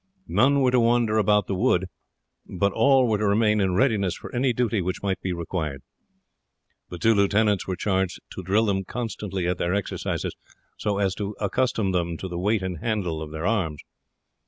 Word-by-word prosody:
None 140 +2 +3
were 130 -1 +3
to 125 - +4
wander 115 -2 +3
about 105 -1 +3
the - - -3
wood, 95 -2 +2 0.6
but 100 +1 0
all 135 -2 +4
were 110 -2 +1
to 105 - +1
remain 105 +1 +3
in 95 -2 +1
readiness 100 -6 +2
for - - -10
any 125 +1 +2
duty 115 -3 0
which 90 +2 -3
might 95 -1 -1
be 95 - -2
required. 80 -5 -4 1.1
The 90 - -7
two 115 +6 +3
lieutenants 100 0 +2
were 95 - -1
charged 95 0 -1
to - - -6
drill 100 +5 +2
them 95 -2 0
constantly 100 -4 -4
at 90 0 -1
their 90 +2 0
exercises 100 - -3 0.4
so 105 -2 -2
as 100 -2 +1
to 100 +1 -3
accustom 110 -1 0
them 85 -2 -1
to 95 - -5
the 85 -1 -5
weight 105 +2 +1
and 90 -3 -4
handle 100 -8 -2
of 80 - -6
their 80 +2 -5
arms. 95 -9 0
100 Hz, 190 wpm, -25 LUFS, 90-110 Hz, 1.1 s, to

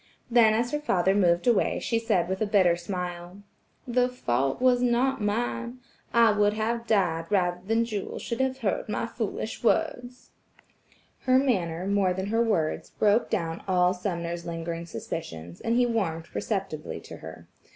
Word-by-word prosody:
Then 225 -2 +6
as 240 +2 0
her 295 - 0
father 190 -9 +2
moved 175 -3 +3
away 240 -4 +3
she 230 - 0
said 215 -7 +1
with 190 +2 -3
a 215 - +1
bitter 185 -4 +4
smile: 180 +1 -6 0.4
"The 250 +1 +2
fault 135 - -1
was 250 -1 +4
not 250 +1 +2
mine. 235 +3 -2 0.3
I 230 -1 +5
would 210 0 +2
have 230 +2 -2
died 175 -7 +1
rather 180 -3 +1
than 225 +1 +2
Jewel 210 -4 -4
should 235 +1 -3
have 260 0 0
heard 215 0 -1
my 210 - -1
foolish 225 -1 -4
words." 245 +1 -1 1.0
Her 255 0 +6
manner 185 -10 0
more 195 -2 +2
than 190 +2 -3
her 225 +2 +2
words, 190 -9 0
broke 215 +2 +2
down 165 +3 -2
all 180 -1 +3
Sumner's 175 -2 -4
lingering 170 0 -5
suspicions, 85 - -7
and 230 - 0
he 245 0 +4
warmed 185 -9 -1
perceptibly 195 -8 -3
toward - - -11
her. - - -10
205 Hz, 160 wpm, -27 LUFS, 175-235 Hz, 1.0 s, Then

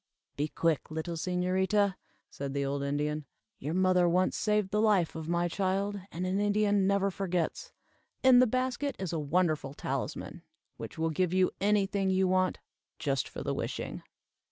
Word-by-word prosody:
"Be 145 +2 -1
quick, 160 -1 0
little 160 +2 -4
señorita," 185 +4 +1 0.4
said 140 0 -5
the 140 0 0
old 140 +1 -2
Indian. 145 +1 -1 0.3
"Your 150 +5 -3
mother 185 -1 +4
once 185 +2 +2
saved 210 -2 +1
the 210 +1 +2
life 205 -6 +3
of 160 0 -5
my 175 0 +1
child, 195 +2 -1
and 180 +2 -3
an 185 +2 0
Indian 205 -1 +2
never 200 0 +2
forgets. 180 -3 -2 0.5
In 260 -1 +8
the 255 - +6
basket 255 +4 -1
is 190 -3 -4
a 165 - 0
wonderful 155 -2 0
talisman, - - -4 0.4
which - - -8
will 160 0 0
give 180 +3 0
you 185 -1 +3
any 205 0 +3
thing 195 0 -1
you 190 0 +3
want, 185 0 +2 0.4
just 140 -5 -1
for - - -6
the - - -1
wishing." - - -4
185 Hz, 170 wpm, -30 LUFS, 160-200 Hz, 0.5 s, In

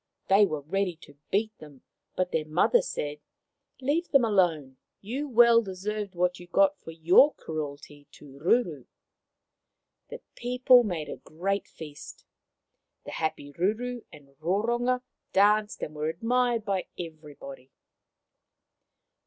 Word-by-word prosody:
They 200 +1 +6
were 155 -4 -4
ready 180 +4 -1
to 145 - -16
beat 215 +2 0
them; 145 -4 -14 0.3
but 185 -1 -1
their 155 -1 -1
mother 180 - +3
said, 150 - -4 0.3
" - - -33
Leave 315 +6 0
them 275 -4 +4
alone. 165 -11 +1 0.2
You 265 +8 -4
well 235 -1 +6
deserved 200 0 -5
what 180 +1 0
you 175 - -12
got 195 +2 +3
for - - -12
your 170 - +5
cruelty 145 -2 -7
to - - -15
Ruru." 165 - +1 1.2
The - - -8
people 250 0 +4
made 175 -8 -3
a - - -6
great 195 +5 -3
feast. 150 -2 -11 0.8
The - - -7
happy 145 -3 -4
Ruru 225 +8 -2
and 145 -2 -15
Roronga 240 +9 0 0.3
danced, 210 +2 +3
and 150 - -5
were 155 +1 -2
admired 235 +5 0
by 195 -3 -1
everybody. 150 -5 -9
190 Hz, 130 wpm, -27 LUFS, 155-230 Hz, 1.2 s, They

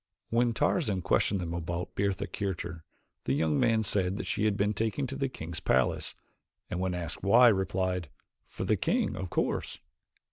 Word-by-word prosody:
When 120 0 +3
Tarzan 110 - +1
questioned 100 - +2
them 85 -1 -3
about 85 +1 -4
Bertha 100 0 0
Kircher, 85 -4 -4 0.4
the 65 - +1
young 75 +1 +1
man 110 -1 +3
said 95 -2 +1
that - - -4
she 110 - 0
had 105 -2 +2
been 105 +1 +1
taken 110 +6 -1
to 135 - -5
the 135 -1 -1
king's 80 -8 -6
palace; 65 0 +1 0.6
and 90 - -2
when 95 -1 -1
asked 85 -3 -4
why 120 +5 +7
replied: 95 -4 0 0.4
"For - - -5
the - - +2
king, - - 0
of 95 -1 -4
course." - - -1
95 Hz, 175 wpm, -30 LUFS, 85-110 Hz, 0.6 s, why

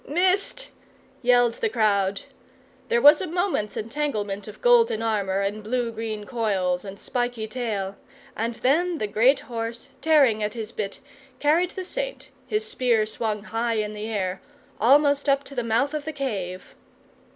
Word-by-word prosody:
"Missed!" 380 - +1 0.5
yelled 245 -2 +4
the 455 - +2
crowd. 200 - +1 0.7
There 235 - +2
was 295 +1 +8
a 375 - -3
moment's 350 - -1
entanglement 215 -5 -3
of 210 - -10
golden 465 - +4
armour 200 -3 0
and 205 +2 -2
blue 240 +1 -1
green 220 -2 -5
coils, 195 -7 -1
and 200 0 -9
spiky 245 -3 -2
tail, 215 -5 -3 0.4
and 230 +1 -2
then 330 +9 +1
the 215 - -1
great 230 +7 +3
horse, 230 +2 -5
tearing 275 -9 +4
at 210 +1 -2
his 225 -1 -5
bit, 205 -3 -5 0.4
carried 325 +5 +3
the 370 0 -6
Saint, - - -5 0.2
his 430 +1 -1
spear 245 - +2
swung 215 -1 -2
high 230 +1 -1
in 210 -1 -2
the 210 +1 -5
air, 190 -4 -2 0.4
almost 285 +4 +4
up 275 0 +3
to 280 - -9
the 250 - -1
mouth 230 +6 +1
of 300 -1 -3
the 315 - -4
cave. 195 -10 -4
230 Hz, 160 wpm, -25 LUFS, 210-290 Hz, 0.7 s, was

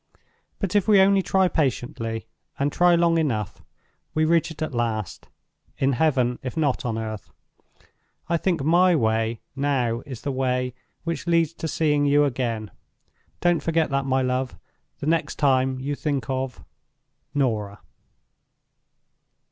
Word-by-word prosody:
But 195 -1 -3
if 205 -1 +3
we 210 -2 +6
only 195 0 +5
try 190 0 +2
patiently, 120 -7 -2 0.3
and 140 +1 0
try 175 +2 +4
long 170 -1 +3
enough, 110 - -2 0.5
we 155 0 +3
reach 165 0 +2
it 160 -1 -5
at 155 - -4
last—in 120 - -4
heaven, 125 -3 +1
if 130 +5 -6
not 145 -5 +1
on 115 -2 -1
earth. 110 -3 -6 1.0
I 170 - +1
think 170 -4 0
my 175 +4 +4
way 110 -3 0
now 135 -5 0
is 130 -5 -7
the 140 - -2
way 125 -1 -1 0.3
which 170 0 -4
leads 165 -2 +2
to 165 - -5
seeing 150 -2 +1
you 145 +1 +4
again. 120 -5 -2 0.7
Don't 175 -2 +3
forget 165 -2 +1
that, 140 0 0
my 130 0 +2
love, 125 0 -1 0.4
the - - -6
next 165 +1 0
time 130 -2 +2
you 140 +2 -3
think 140 -4 -2
of 130 -1 -3 0.7
"NORAH." 110 -7 0
140 Hz, 140 wpm, -24 LUFS, 125-165 Hz, 1.0 s, we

